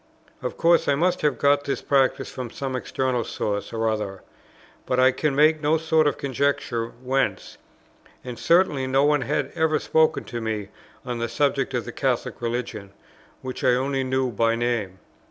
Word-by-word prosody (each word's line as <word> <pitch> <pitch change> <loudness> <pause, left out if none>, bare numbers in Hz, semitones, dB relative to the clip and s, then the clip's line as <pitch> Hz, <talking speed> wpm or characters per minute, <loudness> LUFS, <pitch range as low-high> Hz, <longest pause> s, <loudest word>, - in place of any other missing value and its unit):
Of - - -4
course 170 0 +3
I 140 - +3
must 180 +4 +1
have 150 - +1
got 145 0 +3
this 140 - -3
practice 135 -2 +1
from 125 -2 -6
some 130 +2 -4
external 130 -1 -1
source 100 -1 -3
or 115 0 -1
other; 105 -3 -3 0.6
but 125 - +1
I 130 +1 +6
can 145 +2 -1
make 155 +2 +4
no 155 +2 +2
sort 160 -1 +2
of - - 0
conjecture 135 -3 -1
whence; 130 +3 -2 0.6
and 125 -2 -7
certainly 165 -6 +3
no 135 +2 +3
one 150 -1 +3
had 135 +2 -1
ever 160 -2 +2
spoken 160 +1 +2
to 120 -1 -6
me 110 -3 -3 0.4
on 120 -2 -3
the 115 0 -2
subject 135 +2 0
of - - -2
the - - -6
Catholic - - -2
religion, 115 -4 -4 0.5
which 130 -1 -6
I 125 - +4
only 135 +1 -1
knew 130 -1 0
by 115 +1 +1
name. 115 -6 -2
130 Hz, 175 wpm, -24 LUFS, 120-145 Hz, 0.6 s, I